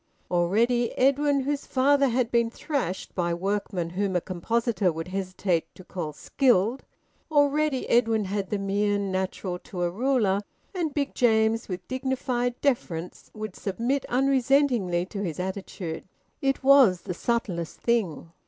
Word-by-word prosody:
Already 225 +8 +2
Edwin, 280 +1 +3
whose 285 +1 -2
father 280 +1 +3
had 245 -1 0
been 235 -1 +2
thrashed 240 - -3
by 170 -2 0
workmen 190 -2 -2
whom 190 +1 -1
a - - +4
compositor 195 +2 0
would 165 +2 -6
hesitate 185 -2 -1
to 185 - -12
call 175 -4 -5
skilled 235 - +1 0.5
already 290 -2 +2
Edwin 225 -3 +3
had 195 0 -3
the 210 - 0
mien 200 0 0
natural 185 -1 -3
to 180 -1 -5
a 175 - 0
ruler, 215 -3 +1 0.3
and 340 -5 -1
Big 280 -2 -1
James, 225 -1 +2
with 180 -1 -5
dignified 255 -1 -2
deference, 180 - -2
would 215 -3 -6
submit 235 +8 -1
unresentingly 255 -8 +2
to 200 +1 -6
his 175 -4 -3
attitude. 185 -3 -5 0.4
It 270 -1 0
was 265 -10 +6
the 180 - -4
subtlest 180 -6 -2
thing. 190 -9 -1
215 Hz, 140 wpm, -26 LUFS, 185-260 Hz, 0.5 s, was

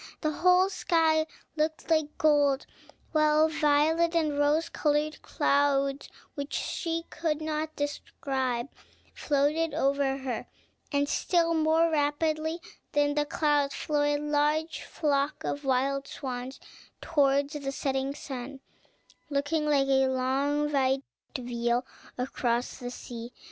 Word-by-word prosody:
The 310 - +1
whole 365 +4 +4
sky 320 -4 +2 0.3
looked 315 +1 -2
like 310 -2 +1
gold, 290 -3 +3 0.5
while 305 0 +4
violet 315 +2 +2
and 310 -3 +1
rose 295 +3 +2
colored 300 0 0
clouds, 280 -1 +1 0.2
which 285 0 -5
she 330 -1 -2
could 315 -3 -1
not 310 0 -3
describe, 265 -3 -2 0.4
floated 295 +2 +1
over 275 -2 +1
her; 260 -4 -4 0.4
and, 285 -1 +1
still 335 +2 +1
more 320 +1 +3
rapidly 310 +2 0 0.3
than 290 0 +2
the 295 0 0
clouds, 290 -2 +1
flew 295 -1 -1
a 290 0 +2
large 300 +2 0
flock 285 -1 -1
of 285 - -3
wild 270 +1 +1
swans 255 0 -6 0.4
towards 280 -2 +2
the 280 -2 -3
setting 270 0 -2
sun, 270 -1 -7 0.7
looking 295 +2 0
like 280 -2 +3
a 265 -1 +3
long 275 +3 0
white 270 0 +2 0.3
veil 240 0 -1 0.3
across 245 -1 -1
the 245 -2 -5
sea. 240 -1 -8
290 Hz, 120 wpm, -28 LUFS, 275-310 Hz, 0.7 s, whole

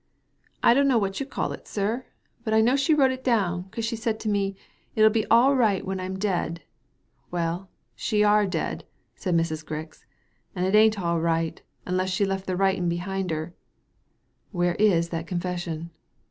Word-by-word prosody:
^^ - - -35
I - - +7
dunno 275 -1 +4
what 195 -3 -1
you 275 - -3
call - - -2
it, - - -9
sir; 220 +5 -2 0.4
but 220 -2 0
I 220 - +6
know 240 +4 +4
she 280 +3 +3
wrote 270 -3 +4
it 260 0 -6
down, 190 -7 0
'cause 225 +3 -4
she 230 0 -2
said 225 -1 -2
to 220 - -2
me, 200 -1 0 0.2
' - - -39
It'll 215 0 +6
be 220 0 0
all 250 +5 +5
right 215 -7 +2
when 190 0 -3
Pm 185 +1 -4
dead/ 175 -4 -2 0.7
Well, 175 +2 -2 0.3
she 210 -1 +1
are 210 0 +4
dead, 190 - -3 0.3
said 180 -3 -1
Mrs. 160 -1 0
Grix, 155 0 -7 0.5
''and 180 0 0
it 190 - 0
ain't 215 0 +5
all 170 -2 0
right, 165 0 0 0.2
unless 185 +1 0
she 195 +2 +1
left 195 0 -3
the 185 -1 -1
writin' 190 -2 +2
behind 185 +2 -2
hen" 160 +1 -3 0.5
" - - -45
Where 175 0 +2
is 175 -6 +3
that 165 0 -4
confession 175 -2 -4
190 Hz, 190 wpm, -25 LUFS, 175-220 Hz, 0.7 s, I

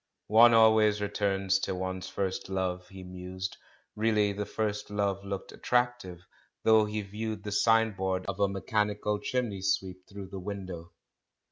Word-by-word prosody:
"One 115 +1 +8
always 110 -2 +5
returns 95 -1 0
to 95 - -2
one's 95 0 -4
first 95 -1 -3
love," 95 -1 -2
he 95 -2 -10
mused; 90 +1 -6 0.4
and 105 - -9
really 105 -2 +2
the 105 +1 -4
first 105 -2 -2
love 100 -1 -1
looked 100 -1 -5
attractive, 120 -8 -1 0.4
though 110 -1 +5
he 105 0 -3
viewed 105 +1 -5
the 105 - -5
signboard 100 -4 +2
of 100 0 -4
a 100 -1 +3
"mechanical 105 +1 -1
chimney 115 -7 -2
sweep" 95 -1 -2
through 100 -2 -8
the 95 - -6
window. 90 -3 -7
100 Hz, 150 wpm, -29 LUFS, 95-105 Hz, 0.4 s, One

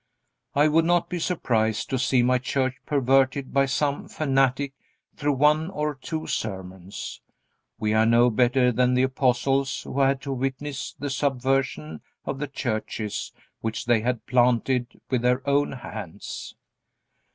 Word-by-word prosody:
I 145 +2 +5
would 160 +2 +3
not 175 0 +2
be 180 - -3
surprised 115 - 0
to 130 - 0
see 125 -1 +3
my 125 +1 +3
church 130 +1 0
perverted 135 -1 +2
by 140 0 +3
some 140 +2 -1
fanatic 135 -1 +1 0.4
through 145 -1 0
one 150 +4 +3
or 150 -4 -2
two 155 +4 -5
sermons. 95 -2 -5 0.6
We 105 0 0
are 110 +1 +4
no 120 +1 +5
better 125 +2 +3
than 125 +1 +2
the 125 - +3
apostles 130 +1 +1
who 140 - -4
had 135 0 +3
to 140 -3 -3
witness 135 +2 -3
the 145 -1 -4
subversion 130 - -1 0.2
of 135 - -3
the 145 - -2
churches 110 -5 -3 0.3
which 110 0 -3
they 120 -1 +4
had 125 0 -2
planted 125 +1 +1
with 125 -2 +2
their 125 +2 +1
own 140 +1 +2
hands. 110 -8 -7
130 Hz, 145 wpm, -25 LUFS, 120-140 Hz, 0.6 s, I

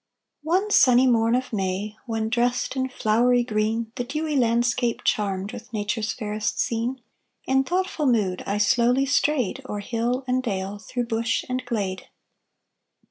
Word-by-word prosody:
One 370 +7 0
sunny 250 -5 +6
morn 230 -2 +3
of 255 -1 -2
May, 195 +1 -2
When 225 -1 -1
dressed 245 +2 0
in 260 0 -1
flowery 245 +1 +2
green 225 0 -1
The 245 - -1
dewy 305 +4 -2
landscape, 240 -1 +1
charmed 200 -1 0
With 240 0 -10
Nature's 215 +1 -1
fairest 210 -2 -3
scene, 235 +2 -1 0.4
In 265 0 +3
thoughtful 350 -2 -1
mood 205 -7 +1
I 200 - 0
slowly 245 +5 +3
strayed 275 -3 +1
O'er 210 - -3
hill 235 +5 -1
and 255 +1 +1
dale, 200 -3 -3
Through 245 +3 -3
bush 230 0 -1
and 255 0 -2
glade. 200 -6 -3
235 Hz, 145 wpm, -24 LUFS, 215-255 Hz, 0.4 s, sunny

